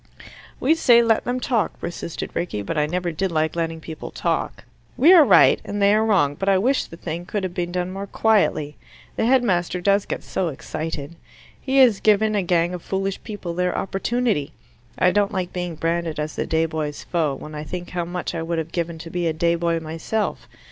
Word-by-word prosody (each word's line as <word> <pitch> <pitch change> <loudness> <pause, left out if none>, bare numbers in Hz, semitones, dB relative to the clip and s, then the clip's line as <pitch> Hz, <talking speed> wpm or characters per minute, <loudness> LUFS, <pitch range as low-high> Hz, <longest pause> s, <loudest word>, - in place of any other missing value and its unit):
"We 285 +5 +3
say, 240 -7 +5
'Let 225 -1 +2
them 245 +1 -1
talk,'" 230 -6 -1
persisted 170 -1 -5
Rickie, 105 -13 -3
"but 165 - -4
I 150 -1 +1
never 175 +2 -2
did 185 +4 -2
like 155 0 0
letting 165 -1 -2
people 160 -1 -8
talk. - - -2 0.3
We 320 +8 +7
are 340 -4 +9
right - - +6
and 205 - -4
they 200 0 +5
are 215 +1 +3
wrong, 190 -10 +3
but 195 +7 -2
I 195 - +4
wish 255 +8 +1
the 165 - -12
thing 170 +1 -5
could 205 -2 -2
have 185 -2 -3
been 175 -1 -3
done 180 0 -2
more 195 +1 -5
quietly. 190 -10 +1 0.4
The 225 - +1
headmaster 190 -9 +2
does 200 +2 +2
get - - -4
so 185 - -2
excited. 155 +1 -5 0.4
He 265 0 0
has 245 -7 +6
given 215 0 +3
a 205 - +2
gang 175 -1 +1
of 180 - -5
foolish 195 +1 -3
people 205 -6 -6
their 180 +1 -1
opportunity. 200 - -1 0.4
I 180 - +4
don't 205 +1 +1
like 185 -3 -3
being 175 -2 -3
branded 165 0 -2
as 150 0 -3
the - - -2
day 160 0 +2
boy's 155 -2 -4
foe, 155 -5 0
when 150 +3 -9
I 150 0 -5
think 175 +3 -6
how 175 -1 -2
much 175 +1 -4
I 165 - -3
would 165 +1 -2
have 160 0 -3
given 170 -2 -3
to 165 +1 -9
be 175 -1 -1
a 160 - 0
day 170 +2 +1
boy 170 0 0
myself. 165 +7 -3
175 Hz, 215 wpm, -22 LUFS, 165-205 Hz, 0.4 s, are